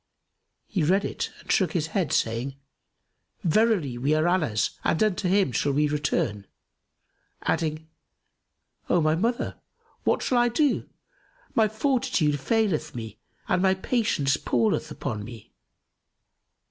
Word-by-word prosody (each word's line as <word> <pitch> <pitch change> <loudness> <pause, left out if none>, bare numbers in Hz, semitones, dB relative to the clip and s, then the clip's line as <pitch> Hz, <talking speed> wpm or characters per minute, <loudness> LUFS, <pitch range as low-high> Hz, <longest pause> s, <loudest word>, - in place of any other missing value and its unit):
He 195 - -2
read 190 +6 +2
it - - -3
and - - -5
shook 180 -5 +2
his 165 -4 0
head, 180 -8 0
saying, 115 +4 0 0.9
"Verily, 175 - +2
we 145 +5 +2
are 155 +2 +2
Allah's 155 - +1
and 165 - +2
unto 200 -3 0
him 195 -6 +3
shall 140 +5 0
we 150 +2 +2
return!" 130 -9 -1 1.0
adding, 160 -1 -1 1.0
"O 175 - +4
my 155 -1 +3
mother, 230 +9 -1 0.4
what - - +1
shall 250 - +2
I 240 - +4
do? 280 +4 +1 0.6
My 220 -1 +4
fortitude 220 - +1
faileth 205 - 0
me 110 -2 -7 0.3
and 180 - +2
my 190 0 +4
patience 190 - +1
palleth 115 -3 0
upon 105 -1 -4
me!" 115 -1 -11
160 Hz, 130 wpm, -26 LUFS, 140-210 Hz, 1.0 s, O